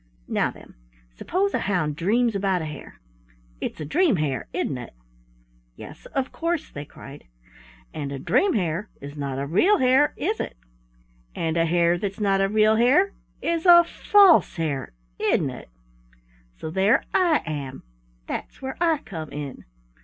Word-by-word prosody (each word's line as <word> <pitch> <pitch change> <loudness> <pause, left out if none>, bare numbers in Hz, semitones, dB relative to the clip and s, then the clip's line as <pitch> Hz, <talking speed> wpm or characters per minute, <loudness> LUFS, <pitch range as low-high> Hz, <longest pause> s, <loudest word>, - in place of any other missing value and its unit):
Now - - +1
then, - - -14 0.4
suppose 375 - -1
a - - +1
hound 155 -7 -1
dreams 225 +8 +1
about 195 -3 0
a - - -4
hare? 150 -2 -9 0.6
It's - - -5
a 155 - -4
dream 315 - +2
hare, 145 -7 -2
isn't - - -2
it?" - - -10 0.8
"Yes, - - -11
of 270 -1 -3
course," 335 -1 -2
they 145 0 -7
cried. 140 0 -13 0.7
"And 140 -2 -5
a 140 - -4
dream 380 - +2
hare 185 0 -1
is 140 +1 -9
not 140 -3 -4
a 140 - -2
real 345 - +3
hare, 260 +3 +3
is 425 +7 -1
it? - - -5 0.8
And 165 -1 -1
a 165 0 +2
hare 170 +1 +2
that's 200 +1 -4
not 195 -2 +2
a 195 - +2
real 215 +1 +4
hare 285 - +4 0.3
is 335 +1 0
a 345 -1 +9
false 390 +1 +4
hare, 145 - -3 0.3
isn't - - +1
it? - - -11 0.9
So 160 - -6
there 195 +8 +3
I 345 -4 +3
am. 140 -4 -5 0.4
That's - - -6
where 265 0 -6
I 325 -4 +2
come 160 -5 -7
in. 145 -2 -7
195 Hz, 160 wpm, -24 LUFS, -, 0.9 s, a